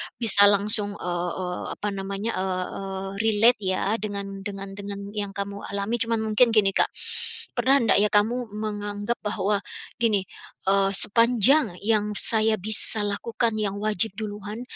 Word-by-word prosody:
bisa 205 -3 +5
langsung, 205 0 0
eee 175 -1 -4
eee, 180 -1 -6
apa 210 - -5
namanya, 195 +3 -5
eee, 190 +1 -5
relate 225 +2 +2
ya 195 +2 -2
dengan 200 -1 -7
dengan 195 -1 -8
dengan 200 0 -8
yang 205 -2 -6
kamu 200 0 -6
alami 200 +4 -4
cuman 230 0 +1
mungkin 230 +4 +4
gini 195 -2 +3
Kak, - - +2 0.7
pernah 270 +1 +2
ndak 225 - +3
ya 210 - +3
kamu 230 +4 0
menganggap 205 +1 -5
bahwa 210 -1 -2 0.4
gini, 215 -5 +1 0.5
eee, 195 0 +2
sepanjang 230 - +3
yang 210 -1 0
saya 220 -1 +6
bisa 215 +1 +8
lakukan 225 +3 -3
yang 200 -2 -2
wajib 215 -1 +2
duluan, 210 +1 -8
205 Hz, 140 wpm, -23 LUFS, 195-220 Hz, 0.7 s, bisa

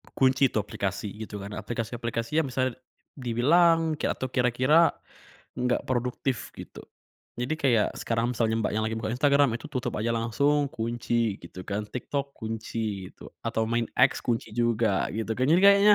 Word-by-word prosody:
Kunci 135 +1 +4
itu - - -2
aplikasi, 100 0 -3 0.2
gitu, 105 -1 -7
kan. 100 - -7
Aplikasi-aplikasi 115 +4 -2
yang 150 - -3
bisa 130 +1 +1 0.5
dibilang, 160 +7 +3
kek - - 0
atau 130 - -3
kira-kira 130 +6 +4 0.7
enggak 125 0 +1
produktif, 125 0 -2
gitu. - - -10 0.6
Jadi, 125 +6 -1
kayak 125 -8 +2
sekarang 115 +2 -1
misalnya 110 -1 +1
Mbak - - -1
yang 110 0 0
lagi 110 0 -1
buka 110 - -3
Instagram 140 -2 +3
itu - - -14
tutup 130 -4 -3
aja 115 +2 0
langsung, 140 +6 +1
kunci, 115 -1 -1
gitu, 90 +2 -9
kan. 105 +1 -2
TikTok 140 +5 -4
kunci 110 -3 -4
itu, - - -12 0.2
atau 110 - 0
main 115 -1 +1
X - - +5
kunci 115 -2 -1
juga, 115 -4 +1
gitu, 110 +1 -2
kan. 130 - +2
Jadi, 170 - +5
kayaknya 200 +1 +7
120 Hz, 160 wpm, -27 LUFS, 110-135 Hz, 0.7 s, kayaknya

